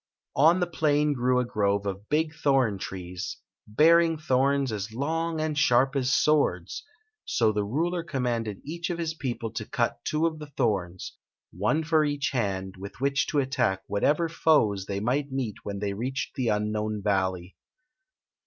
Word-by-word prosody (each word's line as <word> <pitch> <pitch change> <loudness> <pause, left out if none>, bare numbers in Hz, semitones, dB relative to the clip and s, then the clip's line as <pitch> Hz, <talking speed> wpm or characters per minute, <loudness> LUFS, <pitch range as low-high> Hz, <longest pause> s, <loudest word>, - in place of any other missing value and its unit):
On 160 +6 +5
the 175 - +2
plain 150 -3 +1
grew 125 -1 +1
a 125 - 0
grove 100 -4 0
of 100 +1 -5
big 155 +1 +1
thorn 135 -9 +1
trees, 90 -1 -6 0.3
bear 160 +10 +6
ing 165 -1 +1
thorns 140 -2 +1
as 105 0 -4
long 160 +6 -2
and 155 -1 -1
sharp 135 -1 +3
as 130 -1 +1
swords; 155 - +1 0.4
so 110 -2 +2
the 105 -1 -1
ruler 165 - -1
commanded 120 - -2
each 170 +4 -4
of 175 - -2
his 165 -1 -2
people 120 -7 -4
to 115 0 -4
cuf 120 +2 0
two 155 +2 0
of 160 -2 -1
the 150 - -8
thorns, 100 -10 -2 0.3
one 105 - 0
for 160 -1 +3
each 145 -2 -1
hand, 95 -6 -2
with 100 +4 -9
which 140 +1 +1
to 150 - -2
attack 130 -8 +1
what 100 - -3
ever 160 +3 +3
f^es 115 - +2
they 100 0 -2
might 135 +6 -1
meet 130 -6 -3
when 100 -1 -5
they 100 0 -2
reached 130 +6 -3
the 130 -3 -2
unknown 105 0 -1
valley. 95 -3 -1
130 Hz, 170 wpm, -27 LUFS, 105-150 Hz, 0.4 s, bear